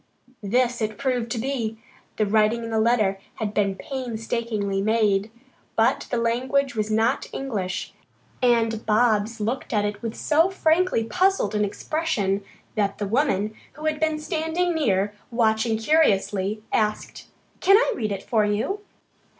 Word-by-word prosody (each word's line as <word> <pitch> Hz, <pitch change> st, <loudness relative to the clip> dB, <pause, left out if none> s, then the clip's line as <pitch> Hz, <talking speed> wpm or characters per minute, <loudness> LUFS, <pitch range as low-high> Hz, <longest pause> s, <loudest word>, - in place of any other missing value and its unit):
This 245 Hz, +4 st, +1 dB
it 215 Hz, -1 st, -2 dB
proved 250 Hz, -4 st, -1 dB
to 235 Hz, -, -2 dB
be. 230 Hz, -3 st, -2 dB, 0.4 s
The 215 Hz, -, +2 dB
writing 215 Hz, +3 st, +2 dB
in 230 Hz, -, -5 dB
the 220 Hz, -, +1 dB
letter 215 Hz, -4 st, +2 dB, 0.2 s
had 210 Hz, -2 st, -3 dB
been 200 Hz, -2 st, +1 dB
painstakingly 225 Hz, -5 st, -3 dB
made, 210 Hz, -1 st, +2 dB, 0.5 s
but -, -, +2 dB
the 245 Hz, -, 0 dB
language 255 Hz, +4 st, +1 dB
was 215 Hz, -2 st, -2 dB
not 225 Hz, +4 st, +1 dB
English, 205 Hz, -9 st, -3 dB, 0.5 s
and 230 Hz, -3 st, +2 dB
Bobs 220 Hz, 0 st, +2 dB
looked 230 Hz, +5 st, -2 dB
at 205 Hz, -1 st, +2 dB
it 205 Hz, 0 st, -3 dB
with 230 Hz, -2 st, -4 dB
so 320 Hz, +4 st, +3 dB
frankly 355 Hz, -7 st, +2 dB
puzzled 370 Hz, -, +1 dB
an 210 Hz, 0 st, +1 dB
expression 205 Hz, -4 st, -1 dB, 0.3 s
that 200 Hz, -2 st, 0 dB
the 205 Hz, -, -2 dB
woman, 215 Hz, -3 st, +1 dB, 0.2 s
who 305 Hz, +2 st, -9 dB
had 310 Hz, -1 st, 0 dB
been 315 Hz, -1 st, +1 dB
standing 320 Hz, +2 st, -1 dB
near, 205 Hz, -, +1 dB, 0.2 s
watching 225 Hz, -1 st, +1 dB
curiously, 215 Hz, -6 st, +2 dB
asked: 215 Hz, -1 st, -1 dB, 0.3 s
"Can 390 Hz, +2 st, +6 dB
I -, -, +2 dB
read 215 Hz, -2 st, -2 dB
it 195 Hz, -1 st, -4 dB
for 220 Hz, -3 st, +2 dB
you?" 210 Hz, -, -1 dB
225 Hz, 150 wpm, -24 LUFS, 210-270 Hz, 0.5 s, Can